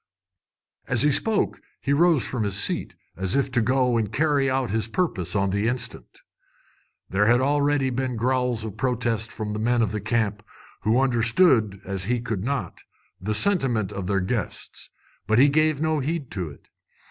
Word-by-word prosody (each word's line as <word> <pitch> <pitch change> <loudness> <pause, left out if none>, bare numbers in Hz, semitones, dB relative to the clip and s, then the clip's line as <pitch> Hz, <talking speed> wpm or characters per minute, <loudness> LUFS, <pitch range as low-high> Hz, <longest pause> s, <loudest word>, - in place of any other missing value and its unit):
As 125 0 +2
he 150 - +4
spoke 215 +9 +1 0.2
he 140 - -1
rose 165 -2 +3
from 125 - -3
his 100 -2 -1
seat, 100 - 0 0.2
as 95 +1 -1
if 140 -1 0
to 120 -2 +2
go 125 0 +2
and 110 -3 -1
carry 145 +1 +1
out 130 -4 -1
his 110 -1 -1
purpose 110 - -2
on 100 -1 +1
the 100 +3 0
instant. 125 +1 -5 0.9
There 105 +2 +2
had 120 - +6
been - - 0
already 145 -1 +1
growls 125 -1 -1
of 105 - -7
protest 120 -3 -1
from 105 -1 -5
the 105 - -3
men 120 +1 +2
of 105 - -1
the 105 -1 -3
camp, 110 -1 -1 0.4
who 110 +4 +2
understood, 115 - +3
as 95 -1 -3
he 120 +3 0
could 110 -5 -4
not, 140 +3 -3 0.4
the 105 +3 +1
sentiment 120 - +3
of 100 -2 -5
their 100 -1 +1
guests; 105 +2 -4 0.4
but 110 +1 +2
he 140 +4 +6
gave 155 0 +2
no 155 -1 +1
heed 150 0 -3
to 90 -5 -4
it. 70 - -16
120 Hz, 180 wpm, -24 LUFS, 105-135 Hz, 0.9 s, had